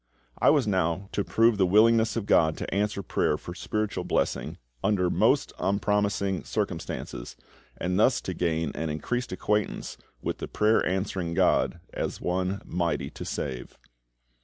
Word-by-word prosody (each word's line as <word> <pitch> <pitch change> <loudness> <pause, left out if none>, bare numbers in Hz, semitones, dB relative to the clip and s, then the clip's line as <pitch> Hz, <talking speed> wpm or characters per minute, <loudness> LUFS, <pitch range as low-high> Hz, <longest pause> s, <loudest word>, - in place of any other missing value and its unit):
I - - +5
was 145 -5 +4
now 95 -1 0
to 100 - 0
prove 115 0 +3
the 95 - +5
willingness 110 +3 +4
of 115 -3 -2
GOD 80 -5 +3
to - - -4
answer 100 0 0
prayer 75 - +1
for 85 - -8
spiritual 105 +3 -2
blessing - - -1 0.3
under 90 -4 +2
most - - +2
unpromising 100 -1 0
circumstances, - - -4 0.4
and 90 +2 -1
thus 125 +3 +4
to 95 - -4
gain 80 -3 0
an 80 0 -3
increased 120 +12 -2
acquaintance 105 +3 -1 0.2
with - - -3
the - - -4
prayer 110 +1 +2
answering 95 -2 -2
GOD 85 - +2
as - - -3
One 95 +2 -1
"mighty 85 -1 -1
to - - -8
save." 65 -3 -5
95 Hz, 150 wpm, -27 LUFS, 85-105 Hz, 0.4 s, I